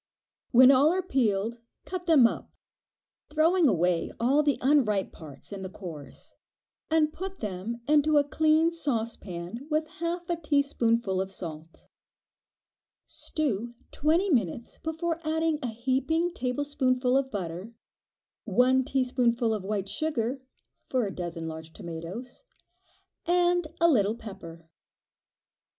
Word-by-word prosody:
When 255 +2 +8
all 275 +4 +5
are 370 +1 0
peeled, 230 - 0 0.3
cut 360 -1 -5
them 305 -7 +7
up, 230 - -1 0.8
throwing 320 +3 +3
away 175 -3 +1
the 285 +4 +3
unripe 245 -8 +2
parts 145 -2 -11
and 195 -1 -6
the 190 - -5
cores, 165 -7 -10 0.6
and 315 -1 +2
put 380 +1 -6
them 210 +3 -4
into 300 0 +4
a 290 - +5
clean 315 +3 +3
saucepan 230 - -3
with 310 0 +1
half 340 +1 -3
a 345 - -1
teaspoonful 235 - +1
of 190 - -4
salt. 165 -3 -9 1.2
Stew 240 -6 -2 0.2
twenty 335 +6 +1
minutes 230 - -1
before 320 +1 -2
adding 320 0 0
a 250 - -2
heaping 265 +9 0
tablespoonful 255 -2 0
of 270 -1 +1
butter, 190 +1 -5 0.7
one 250 +5 +3
teaspoonful 245 -3 +1
of 210 -3 -3
white 200 -1 -2
sugar 255 +2 -1 0.5
(for 255 -3 +1
a 195 - -4
dozen 170 -2 -5
large 160 0 -8
tomatoes) 180 - -8 0.8
and 350 -1 +3
a 335 - +5
little 220 -8 +3
pepper. 170 -7 -10
250 Hz, 120 wpm, -28 LUFS, 200-310 Hz, 1.2 s, When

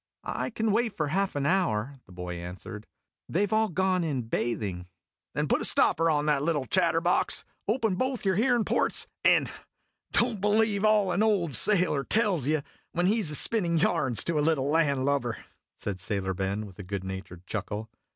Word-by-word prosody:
I - - -3
can 225 -2 -1
wait 225 +1 0
for 155 -2 -1
half 195 +3 0
an 140 -1 -1
hour," 145 - +1
the - - -16
boy 90 0 -6
answered. 90 +5 -8 0.4
"They 195 +5 +1
Ve 205 - -1
all 220 0 +2
gone 185 0 +1
in 140 -6 -2
bathing." 105 -6 -3 0.5
"Then - - 0
put - - +1
a - - -2
stopper 165 +1 +4
on 150 -2 +1
that 150 -2 +2
little 150 -3 0
chatterbox, 175 +1 +2 0.2
open 225 -1 +1
both 255 +3 -2
your 190 - +3
hearin' 240 +1 +2
ports, - - +1 0.2
and - - +4 0.6
don't 235 -4 +1
believe 210 0 +2
all 210 -3 +3
an 185 - +1
old 200 -8 +1
sailor 180 -8 +3
tells 190 - +1
you 155 -1 +1 0.3
when 175 +1 0
he 215 +4 +2
's 150 -6 +1
spinnin' 175 -7 +2
yarns 155 -7 +1
to 165 -3 -1
a - - +2
little 145 -3 +1
landlubber," 140 -5 +1 0.4
said 100 -3 -4
Sailor 95 0 -2
Ben, 95 +3 -2
with 95 -2 -14
a - - -6
good 95 +1 -5
naturecl 95 -2 -8
chuckle. 105 +1 -4
160 Hz, 180 wpm, -27 LUFS, -, 0.6 s, stopper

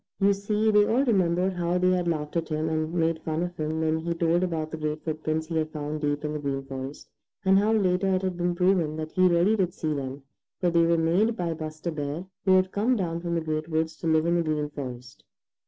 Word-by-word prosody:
You 200 0 +4
see, 210 +2 +1
they 210 0 +6
all 255 +5 +2
remembered 185 -4 +2
how 175 0 0
they 180 0 +3
had 180 -1 +1
laughed 150 -2 -2
at 165 -1 -1
him 155 0 -1
and 155 0 -1
made 165 -1 0
fun 160 +1 -2
of 175 0 -4
him 155 0 -2
when 160 0 +1
he 170 +1 -2
told 170 +1 +2
about 160 -4 -2
the 160 - -4
great 155 0 -3
footprints 155 0 -2
he 160 0 -3
had 155 -1 0
found 150 0 -4
deep 145 0 -1
in 150 - -2
the 150 - -3
Green 140 -1 -2
Forest, 135 +1 -7 0.4
and 190 +1 +5
how 210 +2 +2
later 190 -3 +2
it 185 - -1
had 185 -1 -1
been 175 0 -1
proven 180 -4 +2
that 155 0 -5
he 185 -1 +4
really 175 +5 +3
did 185 -4 0
see 155 -1 -1
them, 135 -1 -5 0.4
for 175 -2 +1
they 170 0 +4
were 170 0 +3
made 185 +8 +2
by 170 -2 -1
Buster 155 +1 -5
Bear 150 +3 -4 0.2
who 190 - +5
had 185 0 +3
come 230 +5 +1
down 170 -6 -2
from 170 -1 -2
the 165 - 0
Great 155 0 -3
Woods 160 0 -1
to 165 - -4
live 160 0 +3
in 170 +1 +2
the - - +2
Green 150 -2 -1
Forest. 125 -3 -8
165 Hz, 250 wpm, -26 LUFS, 155-180 Hz, 0.4 s, they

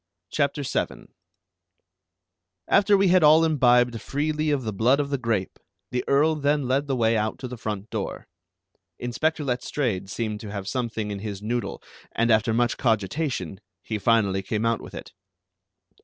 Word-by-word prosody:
CHAPTER 145 0 0
VII - - -3 1.6
After 205 0 +4
we 195 -1 +3
had 185 0 +5
all 155 +2 +6
imbibed 125 -6 +3
freely 150 +2 -1
of 145 -3 0
the 110 -2 -3
blood 120 +8 +3
of 140 -1 -2
the 140 - +1
grape 115 -6 -2 0.3
the 125 - -1
Earl 150 +3 +4
then 145 -2 +1
led 135 +3 +1
the 135 - 0
way 115 -2 +2
out 110 0 -1
to 130 - -6
the 125 - -7
front 105 -2 -5
door. - - -4 0.7
Inspector 155 +6 -1
Letstrayed 125 -6 -2
seemed 105 0 -3
to 105 -2 -8
have 100 -2 -5
something 115 -4 -2
in 100 - -4
his 100 -1 -6
noodle, 120 +2 -3 0.3
and 115 0 +2
after 110 0 +3
much 120 +1 +1
cogitation 110 - -1 0.2
he 110 0 -3
finally 100 -3 +2
came 110 +3 -2
out 115 -1 +1
with - - -10
it. - - -8
120 Hz, 165 wpm, -25 LUFS, 110-145 Hz, 1.6 s, all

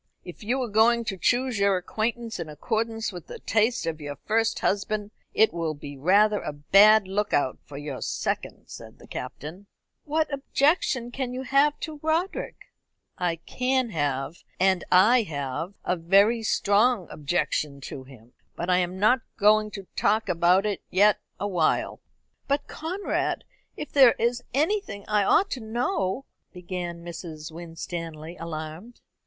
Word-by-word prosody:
"If 175 +3 -10
you 245 +6 0
are - - -3
going 230 +2 +3
to 200 - -2
choose 245 +5 +1
your 200 -1 +3
acquaintance 225 +4 -3
in 165 -2 -5
accordance 225 +8 -2
with 175 -3 -9
the - - -8
taste 225 0 +1
of 160 -1 -3
your 145 -1 -5
first 225 +1 +1
husband, 205 +1 -1 0.2
it 220 -3 +4
will 165 -2 -2
be 145 0 -9
rather 200 +8 +3
a 150 - -4
bad 200 +8 +6
look 205 +2 -1
out 130 -3 +1
for 140 - -10
your 145 -2 -6
second," - - -3
said - - -11
the - - -15
Captain. 175 +8 -8 0.4
"What 310 0 -1
objection 275 -3 +1
can 250 -1 -4
you 260 - -4
have 280 +3 +3
to 310 -2 -6
Roderick?" 325 +4 -2 0.5
"I 175 -2 0
can 255 -1 0
have, 145 -1 -2 0.2
and 190 -1 +3
I 215 +7 +6
have, 155 - -4
a 180 - +1
very 200 +7 +4
strong 215 0 +2
objection 150 -1 -1
to 130 0 -7
him. 125 -3 -17 0.2
But 175 +2 -2
I 180 - +4
am 180 +1 -2
not 215 +7 +4 0.2
going 215 +1 +4
to 195 -2 -8
talk 215 +2 +1
about 180 +2 +3
it 205 -3 -2
yet 205 +2 +4 0.2
awhile." 180 -6 0 0.5
"But, 285 +1 0
Conrad, 365 +6 -2 0.3
if 300 - -6
there 265 -4 +7
is 240 +1 0
anything 300 - -1
I 210 -1 +2
ought 390 - +3
to 260 - -2
know 240 - -1
" - - -48
began 175 -1 -6
Mrs. 165 -2 -7
Winstanley, 165 -1 -7
alarmed. 165 +7 -7
200 Hz, 155 wpm, -26 LUFS, 170-235 Hz, 0.5 s, there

